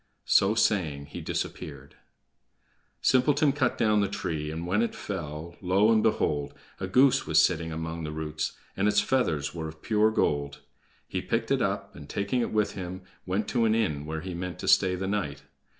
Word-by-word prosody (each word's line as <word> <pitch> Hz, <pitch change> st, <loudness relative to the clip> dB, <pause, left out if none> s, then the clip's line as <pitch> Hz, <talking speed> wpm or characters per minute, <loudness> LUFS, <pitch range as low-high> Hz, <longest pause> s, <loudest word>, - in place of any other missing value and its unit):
So 100 Hz, +3 st, +4 dB
saying, 80 Hz, -11 st, +1 dB
he -, -, -5 dB
disappeared. -, -, -5 dB, 1.1 s
Simpleton 140 Hz, +3 st, +4 dB
cut 135 Hz, -3 st, 0 dB
down 105 Hz, -2 st, +3 dB
the 100 Hz, -, +2 dB
tree, 80 Hz, -6 st, -3 dB
and 80 Hz, +2 st, -4 dB
when 95 Hz, +5 st, +1 dB
it 115 Hz, -, -1 dB
fell, 85 Hz, -3 st, -6 dB
lo, 95 Hz, +4 st, +3 dB
and 110 Hz, -1 st, +4 dB
behold! 75 Hz, -10 st, 0 dB, 0.2 s
a 95 Hz, -, -3 dB
goose 130 Hz, +7 st, +4 dB
was 80 Hz, 0 st, +4 dB
sitting 80 Hz, -1 st, +2 dB
among 80 Hz, +1 st, -4 dB
the 75 Hz, -, -4 dB
roots, 75 Hz, 0 st, -3 dB, 0.2 s
and 100 Hz, +2 st, +1 dB
its 105 Hz, 0 st, +4 dB
feathers 80 Hz, -, 0 dB
were 80 Hz, -2 st, -4 dB
of 80 Hz, 0 st, -11 dB
pure 110 Hz, -1 st, +3 dB
gold. 70 Hz, -9 st, 0 dB, 0.5 s
He -, -, -3 dB
picked -, -, -1 dB
it -, -, +2 dB
up, -, -, -2 dB
and 75 Hz, 0 st, -11 dB
taking 100 Hz, +5 st, -1 dB
it -, -, -2 dB
with 105 Hz, -1 st, +1 dB
him, 95 Hz, 0 st, -6 dB, 0.2 s
went 95 Hz, +3 st, -1 dB
to 120 Hz, -3 st, +2 dB
an 110 Hz, 0 st, +3 dB
inn, 75 Hz, -10 st, -1 dB
where 80 Hz, 0 st, -3 dB
he 90 Hz, +1 st, -6 dB
meant 90 Hz, +1 st, -5 dB
to -, -, -5 dB
stay 90 Hz, -1 st, +4 dB
the 95 Hz, +1 st, -3 dB
night. 95 Hz, -8 st, -2 dB
90 Hz, 190 wpm, -28 LUFS, 80-105 Hz, 1.1 s, So